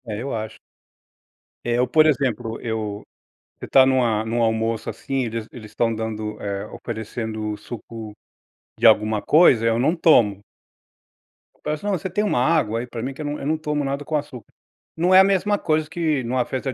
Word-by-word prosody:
é, 110 - -5
eu 135 -1 -4
acho. 110 0 -6 1.0
É, 120 0 0
eu, 125 0 +2
por 155 +4 +4
exemplo, 120 -6 -1
eu 110 -3 -4 0.6
você - - -7
tá 135 -1 +6
numa 120 -5 +2
num 115 +1 -1
almoço, 110 0 0
assim, 135 -2 -3
eles 115 -1 -4
eles 110 -3 -11
estão 115 +1 0
dando, 110 -1 -4
eh, 100 0 -4
oferecendo 110 -1 -5
suco 110 -1 -9 0.7
de - - +1
alguma 110 -1 +3
coisa, 145 -8 +5
eu 115 0 +2
não 140 +8 +2
tomo. 115 - +4 1.3
Parece 150 +4 -3
não, 205 - -1
você 190 -1 -2
tem 210 +4 0
uma 200 - +1
água 130 -7 +1
aí 125 - -5
pra 115 -1 -6
mim, 135 +2 -4
que 145 - -9
eu - - -4
não 145 0 -3
eu - - -6
não 155 +1 +1
tomo 150 -2 -2
nada 140 +1 -3
com 155 - -3
açúcar, 145 -5 -5 0.5
não 180 +3 +2
é 185 - +9
a - - +9
mesma 200 +1 +1
coisa 155 -1 0
que 155 -6 -1
numa 125 +1 0
festa 130 +1 -4
120 Hz, 190 wpm, -22 LUFS, 110-150 Hz, 1.3 s, é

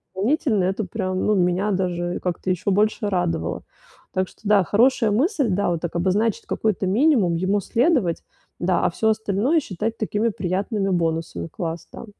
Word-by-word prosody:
дополнительно- 220 - +1
это 195 +3 -1
прям, 185 -1 -2
ну, 210 - +3
меня 185 +2 +1
даже 175 -2 -1
как-то 180 +1 -3
еще 185 +2 0
больше 210 +2 +1
радовало. 175 - -1 0.5
Так 185 0 0
что, - - -22
да, 205 -2 +4
хорошая 225 +4 +3
мысль, 280 - +1
да, 195 0 +1
вот 170 -2 -1
так 170 - -4
обозначить 195 +5 0
какой-то 210 -3 -1
минимум, 215 - +3
ему 185 +4 +1
следовать, 235 - +1 0.4
да, 175 0 +1
а - - +4
всё 220 +6 0
остальное 220 - +1
считать 225 - -4
такими 215 +1 0
приятными 195 +1 -2
бонусами. 165 - -1
Класс, 165 - -5
да. - - -8
195 Hz, 160 wpm, -22 LUFS, 180-220 Hz, 0.5 s, да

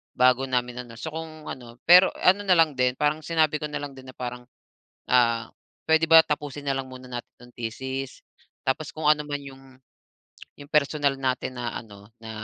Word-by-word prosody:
bago 130 +1 +4
namin 125 -1 -1
ano. 115 - -12
So 160 - -5
kung 160 -1 -8
ano 120 -2 -9
pero 180 +2 +8
ano 190 +3 +4
na 185 - +5
lang 160 -3 +4
din, 125 0 +2
parang 150 +1 +1
sinabi 160 -2 +2
ko 150 - -2
na 145 - -3
lang 145 -1 -6
din 130 0 -12
na 130 - -12
parang, 125 0 -6 0.7
ah, 115 -2 +3 0.4
"Puwede 160 0 +5
ba 165 0 +9
tapusin 145 -1 -4
na 135 - +2
lang 135 -1 -4
muna 130 0 -10
natin 120 0 -6
'tong 120 0 -16
thesis, 130 +3 -5 0.5
tapos 150 +3 -1
kung 155 -1 -2
anuman 150 -1 -2
yung 135 -1 -12 1.0
yung 145 - -12
personal 145 -2 +2
natin 130 -1 -2
na 120 -1 -3
ano, 105 -2 -12
na, 110 0 -10
135 Hz, 190 wpm, -25 LUFS, 125-150 Hz, 1.0 s, ba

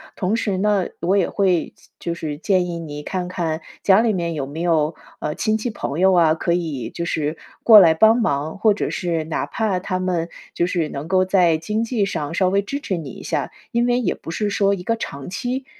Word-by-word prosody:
同 195 +2 0
时 205 -4 -1
呢， 200 -1 +1
我 180 +4 +2
也 190 - +2
会 185 -4 +2
建 - - -24
就 170 - -3
是 150 -3 -5
建 185 -2 +2
议 170 -1 -4
你 150 -2 -7
看 180 +1 -3
看 165 -3 -2 0.2
家 195 +1 +6
里 230 -2 +2
面 170 -3 -2
有 140 -3 -3
没 155 +4 -6
有， 160 -2 +1 0.2
呃， 150 - -3
亲 215 0 +1
戚 240 - -2
朋 165 -7 -4
友 190 +1 +5
啊， 165 -3 +5
可 170 +1 -1
以 145 -10 -2
就 170 - -5
是 155 -1 -2 0.3
过 220 -3 +10
来 165 -4 +6
帮 220 +7 +5
忙， 150 - -1
或 215 +1 +4
者 200 - -2
是 170 -3 -2
哪 155 - -2
怕 210 -5 -1
他 185 0 -3
们 175 -2 -1 0.3
就 175 - +2
是 170 -4 -1
能 140 +3 -6
够 185 +1 +3
在 180 -4 +3
经 210 +8 -2
济 230 -4 0
上 155 -6 -3
稍 185 +1 +2
微 200 +1 +2
支 280 +8 -4
持 190 - -2
你 150 -5 -6
一 - - -11
下， - - -2 0.2
因 235 0 +2
为， 245 0 +2
也 225 -8 0
不 - - -8
是 210 +4 -1
说 200 0 +2
一 195 - -4
个 230 - 0
长 140 -10 -6
期， 250 +7 -3
180 Hz, 250 characters per minute, -21 LUFS, 160-205 Hz, 0.3 s, 过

